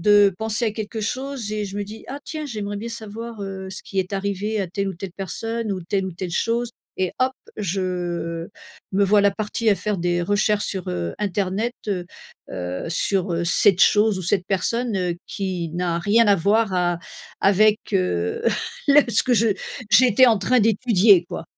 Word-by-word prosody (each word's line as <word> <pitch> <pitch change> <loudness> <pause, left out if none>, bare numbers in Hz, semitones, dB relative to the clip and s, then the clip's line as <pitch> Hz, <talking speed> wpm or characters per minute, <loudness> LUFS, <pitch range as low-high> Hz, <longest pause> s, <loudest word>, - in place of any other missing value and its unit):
de 205 0 +5
penser 220 +1 -1
à 220 - +1
quelque 220 0 -5
chose 255 0 -3
et 210 -1 -2
je 200 0 -7
me 205 - -2
dis: 215 +2 -10
«Ah 280 - -5
tiens! 310 -2 -5
J'aimerais 210 -6 -4
bien 220 +3 -5
savoir, 230 0 -7
heu, 190 -1 -6
ce 190 - -4
qui 195 - -1
est 185 +1 -6
arrivé 200 +2 -2
à 190 - -1
telle 195 +3 -3
ou 190 - -4
telle 180 0 -7
personne 225 +4 -3
ou 190 -2 -2
telle 190 +2 -1
ou - - -4
telle 175 0 -5
chose». 235 +4 0 0.3
Et 185 -1 -1
hop! 260 0 +3 0.3
Je, 195 -2 -2
heu 175 -2 -3 0.4
me 200 +1 +2
voilà 200 0 +4
partie 215 +2 -1
à 200 - +3
faire 210 0 -2
des 175 0 0
recherches 205 +2 +1
sur, 190 -3 -4
heu, 85 -1 -3
internet, 205 +3 -1
heu, 185 -4 -2 0.5
heu, 90 - -4
sur, 180 +2 0
heu, 170 +1 -1
cette 185 +2 +4
chose 210 -2 +4
ou - - -5
cette 180 +1 +1
personne, 225 +3 -1
heu, 180 -2 -1
qui 185 -4 -3
n'a 175 -1 -1
rien 220 +5 +4
à 205 - +6
voir 200 +3 +2
a 175 -1 +1 0.4
avec, 210 +2 +4
heu, 90 - 0 0.5
le 285 +1 +8
ce 220 - +4
que 250 -1 +2
je 225 +1 +3 0.4
j'étais 255 +2 +6
en 230 -3 +5
train 240 +6 +2
d'étudier, 210 -4 +4
quoi. 165 - -5
200 Hz, 195 wpm, -22 LUFS, 185-220 Hz, 0.5 s, le